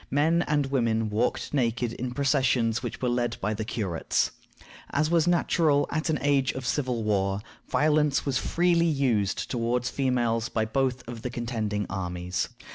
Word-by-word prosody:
Men 160 +5 +3
and 145 -2 +2
women 115 -4 +1
walked 115 +7 -1
naked 120 -3 0
in 125 +2 -4
processions 130 -5 +2
which 120 0 -6
were - - +2
led 120 -1 0
by 105 - -1
the 110 +1 -3
curates. 100 -6 -1 0.6
As 155 +2 0
was 170 -1 +3
natural 160 -4 +3
at 155 +1 -1
an 155 - +2
age 140 -2 +2
of 130 -1 -6
civil 125 -3 -1
war, 100 -2 0 0.3
violence 150 -1 +2
was 135 -1 +1
freely 170 -1 +2
used 125 -10 0
toward 120 0 0
females 120 -4 0
by 110 -1 0
both 130 +2 -1
of 120 -2 -7
the 125 - -3
contending 110 -4 -2
armies. 90 -2 -3
125 Hz, 160 wpm, -27 LUFS, 110-145 Hz, 0.6 s, Men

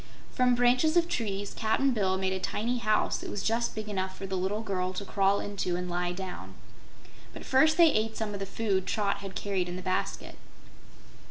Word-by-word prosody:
From 250 -1 +3
branches 250 +7 +3
of 340 -1 +4
trees 205 - -3
Cap'n 235 +5 +1
Bill 190 -5 +1
made 190 0 0
a 190 - -2
tiny 235 +6 -1
house 215 -2 +1
that - - -6
was 200 - -4
just 230 +1 0
big 215 -1 -5
enough 190 -2 -3
for 195 - -6
the 190 0 -3
little 190 +4 -1
girl 185 -3 -2
to 200 +2 -5
crawl 195 0 +2
into 195 -3 -2
and 180 0 -3
lie 175 0 -1
down. 180 - -7 0.8
But - - -9
first 310 +4 +4
they 335 -3 +7
ate 220 +1 0
some 215 -2 -3
of 200 - -4
the 195 - -4
food 195 -3 -1
Trot 205 -2 0
had 195 -1 -8
carried 190 -3 -1
in 175 - -4
the 185 - -6
basket. 185 0 -3
200 Hz, 205 wpm, -29 LUFS, 190-225 Hz, 0.8 s, they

